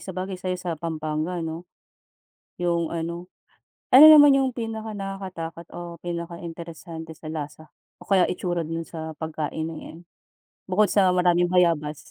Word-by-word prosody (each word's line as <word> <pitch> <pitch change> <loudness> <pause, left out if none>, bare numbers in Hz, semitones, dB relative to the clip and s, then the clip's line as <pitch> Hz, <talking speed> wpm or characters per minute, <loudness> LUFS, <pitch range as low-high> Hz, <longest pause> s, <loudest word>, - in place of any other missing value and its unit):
sabagay 185 0 -5
sa'yo 185 0 -2
sa 180 -1 -4
Pampanga, 160 +1 -3
no? 165 +2 -6 0.9
Yung 170 -1 0
ano 170 +2 -4 0.6
ano 270 +4 +10
naman 290 -3 +9
yung 265 -2 +1
pinakanakakatakot 195 -7 -6
o 170 -1 -7
pinakainteresante 170 -1 -7
sa - - -16
lasa 155 0 -6 0.3
o - - -15
kaya 190 -3 +3
itsura 175 -1 -2
dun 165 +1 -4
sa 160 -2 -7
pagkain 160 0 -4
'no 160 -1 -6
em 170 +2 -12 0.6
bukod 200 +3 +2
sa 195 -3 +4
maraming 175 0 +3
bayabas? 165 -4 +2
170 Hz, 135 wpm, -24 LUFS, 160-185 Hz, 0.9 s, ano